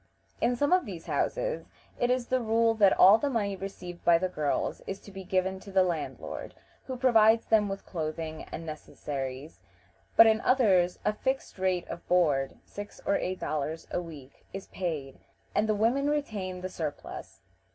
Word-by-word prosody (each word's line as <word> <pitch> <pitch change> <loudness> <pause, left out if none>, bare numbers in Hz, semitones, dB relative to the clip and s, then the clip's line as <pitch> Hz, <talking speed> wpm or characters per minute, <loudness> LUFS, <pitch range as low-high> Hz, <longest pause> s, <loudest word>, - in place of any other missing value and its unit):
In 245 +1 +2
some 285 +7 +2
of 365 -7 +3
these 175 -5 -7
houses - - -1 0.3
it 245 - +2
is 250 -1 +1
the 255 +1 +1
rule 225 0 +3
that 205 -4 +4
all 200 +4 +8
the 285 - 0
money 205 -6 -1
received 180 -2 -8
by 170 -1 +6
the 185 +2 -1
girls 150 -5 -1
is 195 0 -4
to 205 - -13
be 195 0 -8
given 190 +1 0
to 200 - -11
the 190 -1 +4
landlord, 170 -4 -4 0.3
who 260 -1 -4
provides 225 -3 +5
them 210 -2 +3
with 195 0 -5
clothing 160 -1 -4
and 165 - -6
necessaries, 140 -4 -6 0.6
but 225 - +10
in 220 0 +4
others 190 -9 +3
a 210 - +2
fixed 265 -2 -3
rate 185 -2 0
of 170 - -8
board 150 -7 +2
six 205 0 -9
or 200 - +2
eight 185 0 -3
dollars 155 +2 -3
a - - -1
week 150 -6 -12
is 195 - -6
paid, 155 -8 -4 0.3
and 215 +1 +1
the 215 - +3
women 245 +7 +2
retain 205 -11 -2
the 185 - -4
surplus. 155 -5 -6
190 Hz, 180 wpm, -29 LUFS, 165-225 Hz, 0.6 s, but